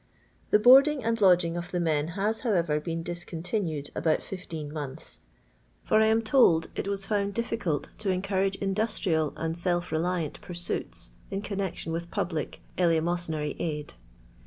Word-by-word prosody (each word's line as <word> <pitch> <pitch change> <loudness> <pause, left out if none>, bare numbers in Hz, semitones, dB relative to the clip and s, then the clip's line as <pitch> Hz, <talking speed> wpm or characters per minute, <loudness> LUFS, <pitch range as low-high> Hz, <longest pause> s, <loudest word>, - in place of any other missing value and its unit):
The - - +6
boarding 270 +5 +7
and 230 0 0
lodging 180 -3 +5
of 175 0 -4
the 180 - -1
men 155 -3 +1
has, 215 +3 0
however, 170 -11 +1
been 165 +1 -4
diseontinued 170 -2 -3
about 160 -2 +1
fifteen 160 -6 -6
months; 145 -3 -6 0.6
for 215 - +3
I 220 - +5
am 225 +1 +3
told 215 -9 +4
it - - -3
was 200 -1 -2
found 200 -1 0
difficult 225 -10 -1
to 210 -2 -2
encourage 195 +1 0
industrial 195 -6 0
and 165 0 -2
self 175 0 -1
reliant 165 -1 -1
pursuits 175 - -4 0.2
in 195 +1 -3
connection 195 -5 -3
with 170 +1 -4
public 160 -4 -3 0.2
elee 165 -2 +4
mosynary 160 -3 -2
aid. 150 -3 -3
175 Hz, 150 wpm, -28 LUFS, 160-200 Hz, 0.6 s, boarding